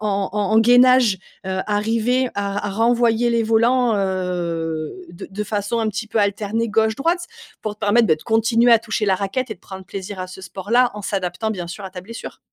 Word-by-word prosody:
en 200 Hz, -2 st, -1 dB
en 210 Hz, -1 st, -1 dB
en 220 Hz, -, +6 dB
gainage, 245 Hz, -2 st, +5 dB, 0.3 s
heu, 190 Hz, 0 st, -1 dB
arriver 225 Hz, +4 st, +1 dB
à 200 Hz, 0 st, -2 dB
r 205 Hz, -, -3 dB
à -, -, -2 dB
renvoyer 235 Hz, +2 st, +2 dB
les 235 Hz, -1 st, +2 dB
volants, 230 Hz, +2 st, +3 dB
heu, 175 Hz, -5 st, -2 dB, 0.2 s
de 175 Hz, -, -9 dB
de 210 Hz, +2 st, -4 dB
façon 205 Hz, +2 st, -2 dB
un 225 Hz, -1 st, 0 dB
petit 215 Hz, +2 st, -4 dB
peu 220 Hz, -, -7 dB
alternée, 210 Hz, +2 st, 0 dB
gauche, 220 Hz, +1 st, +2 dB
droite, 340 Hz, +4 st, 0 dB, 0.3 s
pour 215 Hz, -1 st, -4 dB
te 210 Hz, -, -39 dB
permettre, 220 Hz, +2 st, +3 dB
beh, 160 Hz, -, +4 dB
de 155 Hz, -, -14 dB
continuer 230 Hz, +1 st, +3 dB
à 230 Hz, -, +7 dB
toucher 215 Hz, -1 st, -2 dB
la 190 Hz, -1 st, +3 dB
raquette 225 Hz, +6 st, -3 dB
et -, -, -3 dB
de -, -, -26 dB
prendre 190 Hz, +1 st, -10 dB
plaisir 190 Hz, +1 st, -7 dB
à 185 Hz, -, -5 dB
ce 185 Hz, -, -10 dB
sport 190 Hz, +1 st, -9 dB
là, 245 Hz, +1 st, +4 dB
en 210 Hz, -, -7 dB
s'adaptant, 190 Hz, +2 st, -2 dB
bien 180 Hz, -5 st, -4 dB
sûr, 175 Hz, +4 st, -8 dB
à 190 Hz, -, -6 dB
ta 185 Hz, -1 st, -8 dB
blessure. 230 Hz, +5 st, -9 dB
210 Hz, 225 wpm, -21 LUFS, 190-230 Hz, 0.3 s, à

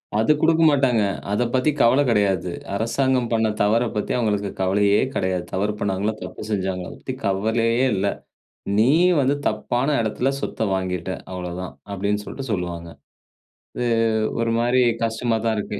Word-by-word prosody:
அது 110 Hz, +6 st, +3 dB
கொடுக்க 165 Hz, 0 st, +4 dB
மாட்டாங்க. 135 Hz, -6 st, +2 dB, 0.3 s
அதை 105 Hz, +4 st, +1 dB
பத்தி 130 Hz, +3 st, +2 dB
கவலை 130 Hz, +5 st, +5 dB
கிடையாது. 95 Hz, -5 st, +1 dB, 0.2 s
அரசாங்கம் 125 Hz, +3 st, +1 dB
பண்ண 115 Hz, -1 st, +2 dB
தவறப் 115 Hz, +3 st, +2 dB
பத்தி 105 Hz, -, -2 dB
அவுங்களுக்கு 105 Hz, -4 st, 0 dB
கவலையே 100 Hz, +2 st, +3 dB
கிடையாது. 95 Hz, -1 st, -1 dB
தவறு 105 Hz, +3 st, 0 dB
பண்ணாங்களா? 100 Hz, +2 st, -1 dB
தப்பு -, -, -7 dB
செஞ்சாங்களா? 95 Hz, -3 st, -2 dB
அதை -, -, -11 dB
பத்தி -, -, -5 dB
கவலையே 115 Hz, +5 st, +1 dB
இல்ல. 100 Hz, +1 st, 0 dB, 0.7 s
"நீ 110 Hz, +3 st, +5 dB, 0.3 s
வந்து 135 Hz, +1 st, +2 dB
தப்பான 120 Hz, +5 st, -1 dB
இடத்தில 120 Hz, +5 st, 0 dB
சொத்த 110 Hz, -5 st, -2 dB
வாங்கிட்ட, 95 Hz, -1 st, -3 dB, 0.2 s
அவ்வளவு 90 Hz, -1 st, -5 dB
தான்." 90 Hz, -, -7 dB, 0.2 s
அப்படீன்ட்டு 105 Hz, +1 st, -1 dB
சொல்லிட்டு, 135 Hz, -3 st, -7 dB
சொல்வாங்க. 85 Hz, -3 st, -4 dB, 0.9 s
இது 120 Hz, -, 0 dB, 0.5 s
ஒரு 115 Hz, 0 st, 0 dB
மாரி 120 Hz, +2 st, +3 dB, 0.2 s
கஷ்டமா 115 Hz, 0 st, -1 dB
தான் 115 Hz, -1 st, +1 dB
இருக்கு. 105 Hz, 0 st, -4 dB
105 Hz, 150 wpm, -22 LUFS, 95-120 Hz, 0.9 s, கவலை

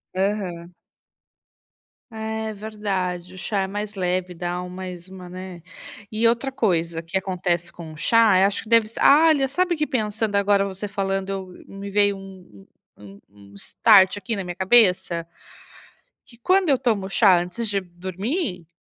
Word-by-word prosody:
Aham. 185 Hz, -3 st, -2 dB, 1.4 s
É 220 Hz, 0 st, -4 dB
verdade, 195 Hz, -4 st, -4 dB
o -, -, -12 dB
chá 200 Hz, +2 st, -2 dB
é -, -, -3 dB
mais 205 Hz, +2 st, -5 dB
leve, 180 Hz, -1 st, -1 dB
dá 175 Hz, +1 st, -4 dB
mais 180 Hz, -1 st, -8 dB
uma, 185 Hz, -1 st, -10 dB
né. 185 Hz, -1 st, -9 dB, 0.5 s
E 220 Hz, +2 st, -1 dB
outra 235 Hz, +4 st, +1 dB
coisa 170 Hz, -9 st, 0 dB
que 170 Hz, +3 st, -2 dB
acontece 175 Hz, -2 st, -2 dB
com 165 Hz, -2 st, -10 dB
o 155 Hz, -, -12 dB
chá, 225 Hz, +2 st, +4 dB
é 190 Hz, -, +5 dB
acho 200 Hz, 0 st, -1 dB
que 215 Hz, -, -14 dB
deve 230 Hz, -2 st, +5 dB
ser 225 Hz, -, -8 dB
ah, 305 Hz, +4 st, +7 dB
olha, 295 Hz, -4 st, +4 dB
sabe 355 Hz, +5 st, +1 dB
que 305 Hz, -1 st, 0 dB
pensando 215 Hz, -5 st, -1 dB
agora 200 Hz, 0 st, +3 dB
você 195 Hz, +1 st, -5 dB
falando, 195 Hz, -1 st, -2 dB
eu 195 Hz, -1 st, -4 dB, 0.2 s
me 195 Hz, 0 st, -8 dB
veio 205 Hz, 0 st, +2 dB
um 185 Hz, -, -14 dB, 0.3 s
um 100 Hz, -1 st, -13 dB
um 100 Hz, 0 st, -18 dB
um -, -, -18 dB
start 190 Hz, -, +4 dB
aqui 205 Hz, +2 st, -3 dB
na 195 Hz, -, -3 dB
minha 175 Hz, 0 st, -5 dB
cabeça? 185 Hz, -4 st, +3 dB, 1.0 s
Que 235 Hz, -, -17 dB
quando 370 Hz, +9 st, +2 dB
eu 275 Hz, -3 st, +4 dB
tomo 220 Hz, -7 st, -1 dB
chá 195 Hz, -3 st, +5 dB
antes 180 Hz, +6 st, -4 dB
de 200 Hz, -1 st, 0 dB
dormir, 185 Hz, -, -4 dB
195 Hz, 170 wpm, -23 LUFS, 180-220 Hz, 1.4 s, ah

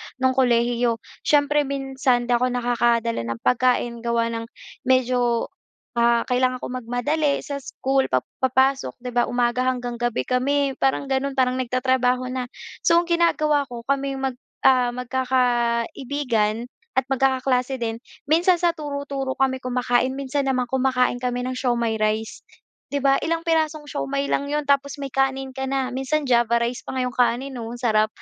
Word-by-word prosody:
nung 260 Hz, 0 st, +2 dB
kolehiyo. 240 Hz, -2 st, +2 dB, 0.3 s
Siyempre 295 Hz, 0 st, +3 dB
minsan 270 Hz, -2 st, 0 dB
'di 240 Hz, -, -3 dB
ako 250 Hz, +1 st, +1 dB
nakakadala 235 Hz, -1 st, +1 dB
ng 115 Hz, 0 st, -4 dB
pagkain 250 Hz, -1 st, +2 dB
gawa 230 Hz, 0 st, 0 dB
ng 230 Hz, 0 st, -4 dB, 0.4 s
medyo, 250 Hz, -2 st, +2 dB, 0.5 s
ah, 235 Hz, 0 st, +4 dB
kailangan 255 Hz, 0 st, 0 dB
ko -, -, -4 dB
magmadali 255 Hz, +5 st, -1 dB
sa 280 Hz, -1 st, -4 dB
school 270 Hz, 0 st, -1 dB
pag 130 Hz, -1 st, +1 dB, 0.2 s
papasok 265 Hz, +1 st, +2 dB
'di 250 Hz, -, -4 dB
ba, 240 Hz, 0 st, +2 dB
umaga 245 Hz, +1 st, +1 dB
hanggang 245 Hz, -2 st, -2 dB
gabi 240 Hz, -1 st, 0 dB
kami 275 Hz, +2 st, +1 dB
parang 270 Hz, +1 st, +1 dB
gano'n 270 Hz, +1 st, 0 dB
parang 255 Hz, -1 st, +1 dB
nagtatrabaho 255 Hz, 0 st, +1 dB
na. 255 Hz, -1 st, -3 dB, 0.3 s
So 335 Hz, -, +3 dB
ang 340 Hz, 0 st, +2 dB
ginagawa 305 Hz, -4 st, +2 dB
ko 240 Hz, -2 st, -8 dB
kami 275 Hz, +1 st, -1 dB
yung 270 Hz, -, -6 dB
mag, -, -, -16 dB, 0.3 s
ah, 250 Hz, -2 st, +4 dB
magkakaibigan 245 Hz, -2 st, 0 dB, 0.3 s
at 265 Hz, -, +3 dB
magkakaklase 265 Hz, -1 st, +1 dB
din 230 Hz, -2 st, -3 dB, 0.2 s
minsan 335 Hz, +5 st, +3 dB
sa 345 Hz, 0 st, +2 dB
turo-turo 280 Hz, -4 st, -4 dB
kami 260 Hz, -1 st, +1 dB
kumakain 250 Hz, 0 st, 0 dB
minsan 275 Hz, 0 st, -2 dB
naman 255 Hz, -2 st, +1 dB
kumakain 255 Hz, 0 st, +1 dB
kami 245 Hz, 0 st, -2 dB
ng 255 Hz, -, -2 dB
siomai 240 Hz, -3 st, 0 dB
rice 215 Hz, +1 st, -1 dB, 0.5 s
'di 285 Hz, -1 st, -3 dB
ba, 275 Hz, 0 st, +4 dB
ilang 330 Hz, 0 st, -1 dB
pirasong 315 Hz, -2 st, 0 dB
siomai 280 Hz, -1 st, -3 dB
lang 280 Hz, -, 0 dB
'yon 295 Hz, +1 st, -1 dB
tapos 280 Hz, 0 st, +1 dB
may 275 Hz, -2 st, -6 dB
kanin 270 Hz, 0 st, 0 dB
ka 265 Hz, +1 st, -4 dB
na, 265 Hz, -1 st, -1 dB
minsan 270 Hz, +4 st, -1 dB
Java 240 Hz, -3 st, +3 dB
rice 240 Hz, +1 st, -2 dB
pa -, -, -5 dB
nga 260 Hz, -, 0 dB
yong 250 Hz, -, -2 dB
kanin, 245 Hz, +2 st, 0 dB
oh, 225 Hz, -, -5 dB
ang 235 Hz, -, -6 dB
sarap. 215 Hz, -2 st, +3 dB
255 Hz, 165 wpm, -23 LUFS, 240-275 Hz, 0.5 s, ah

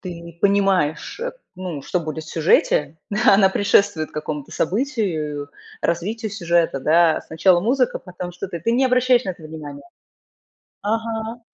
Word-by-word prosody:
ты 175 Hz, -3 st, -7 dB
не 170 Hz, 0 st, -10 dB
понимаешь, 195 Hz, -, +1 dB
э, -, -, -3 dB, 0.2 s
ну, 180 Hz, -6 st, -5 dB
что 180 Hz, -, -1 dB
будет 155 Hz, -1 st, -5 dB
в -, -, -11 dB
сюжете. 155 Hz, -2 st, +2 dB, 0.3 s
Она 195 Hz, -1 st, +7 dB
предшествует 190 Hz, -5 st, +2 dB
какому-то 150 Hz, -2 st, -5 dB
событию, 170 Hz, -, -1 dB, 0.3 s
развитию 210 Hz, +6 st, -2 dB
сюжета, 170 Hz, -7 st, +1 dB
да. 160 Hz, +2 st, +4 dB
Сначала 175 Hz, +2 st, +3 dB
музыка- 250 Hz, +5 st, +1 dB
потом 180 Hz, -1 st, -7 dB
что-то. 180 Hz, -1 st, -6 dB
Ты 230 Hz, +8 st, 0 dB
не 260 Hz, +3 st, +3 dB
обращаешь 250 Hz, -1 st, +3 dB
на 190 Hz, -, -2 dB
это 170 Hz, -2 st, -10 dB
внимание. 150 Hz, -2 st, -8 dB, 1.0 s
Ага. 225 Hz, +2 st, -2 dB
180 Hz, 140 wpm, -21 LUFS, 160-220 Hz, 1.0 s, Она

